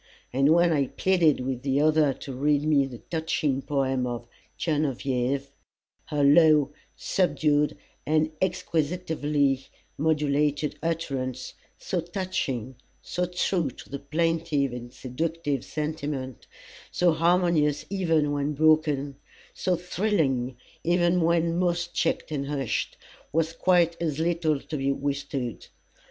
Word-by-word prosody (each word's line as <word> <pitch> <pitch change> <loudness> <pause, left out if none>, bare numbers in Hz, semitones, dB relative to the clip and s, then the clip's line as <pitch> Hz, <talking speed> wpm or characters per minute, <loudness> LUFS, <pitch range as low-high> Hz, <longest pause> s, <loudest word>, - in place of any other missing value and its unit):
And 135 +3 +3
when 170 0 +5
I 140 -3 +1
pleaded 170 -6 +2
with 125 -1 -3
the 135 +1 +1
other 155 -1 +4
to 135 +1 -7
read 145 +2 +1
me 145 -3 +3
the 125 -3 -9
touching 155 -3 -1
poem 135 -3 0
of 120 -1 -4 0.3
"Genevieve" 140 -3 -1 0.5
her 150 -2 -1
low, 150 -1 +5 0.2
subdued 150 -5 +1 0.3
and 155 +1 +1
exquisitely 150 -6 0 0.3
modulated 150 -1 +1
utterance, 135 -6 -3 0.2
so 180 - -2
touching, 160 - -3 0.3
so 180 0 -2
true 180 -3 0
to - - -13
the 140 - -4
plaintive 155 -2 0
and 120 0 -7
seductive 145 +2 -3
sentiment, 150 -4 -4 0.4
so 180 -1 +3
harmonious 165 -3 +2
even 165 -6 +1
when 145 +1 -1
broken, 150 -2 +2 0.4
so 185 - 0
thrilling 160 - 0 0.3
even 175 +1 +2
when 170 +1 +2
most 175 -1 0
checked - - -1
and 140 -2 -2
hushed, 140 -5 -2 0.3
was 165 +2 0
quite 170 -1 +2
as 155 -4 -1
little 165 -2 +1
to 155 - -5
be 135 0 0
withstood. 140 -3 -3
150 Hz, 120 wpm, -26 LUFS, 140-165 Hz, 0.5 s, when